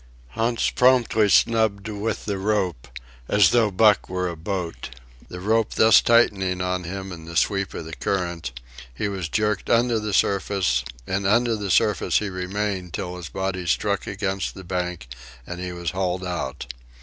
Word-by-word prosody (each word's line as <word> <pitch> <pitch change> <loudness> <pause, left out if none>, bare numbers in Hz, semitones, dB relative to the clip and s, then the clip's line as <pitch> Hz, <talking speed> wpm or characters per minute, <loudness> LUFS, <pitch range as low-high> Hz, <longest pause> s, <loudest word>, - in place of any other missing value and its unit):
Hans 115 - 0
promptly 125 -4 +3
snubbed 110 -2 +3
with 110 +1 -3
the 100 -2 -2
rope, 95 - -1 0.4
as 105 0 +5
though 115 -3 +4
Buck 105 +1 +3
were 90 0 -1
a 85 - -5
boat. 85 -6 -4 0.4
The 90 - -7
rope 110 +3 +1
thus 110 -2 +6
tightening 95 -6 +3
on 90 -1 -2
him 95 +2 -6
in 80 -2 -9
the 85 0 -5
sweep 100 +4 0
of 80 - -5
the 80 - -8
current, 85 -7 -2 0.4
he 65 +12 -3
was 95 -5 -4
jerked 105 0 -1
under 120 -1 +3
the 105 0 -3
surface, 95 -8 +1 0.2
and 95 +4 -1
under 115 +2 +3
the 100 -2 -4
surface 105 +4 +2
he 105 - -1
remained 95 -1 -3
till 90 -3 -4
his 90 -3 -7
body 95 -2 -3
struck 80 - 0
against 95 -1 -3
the 95 - -9
bank 90 -6 -3 0.4
and 90 +4 -7
he 90 0 -4
was 85 -1 -4
hauled 90 -1 -2
out. 70 -8 -4
95 Hz, 170 wpm, -23 LUFS, 90-105 Hz, 0.4 s, thus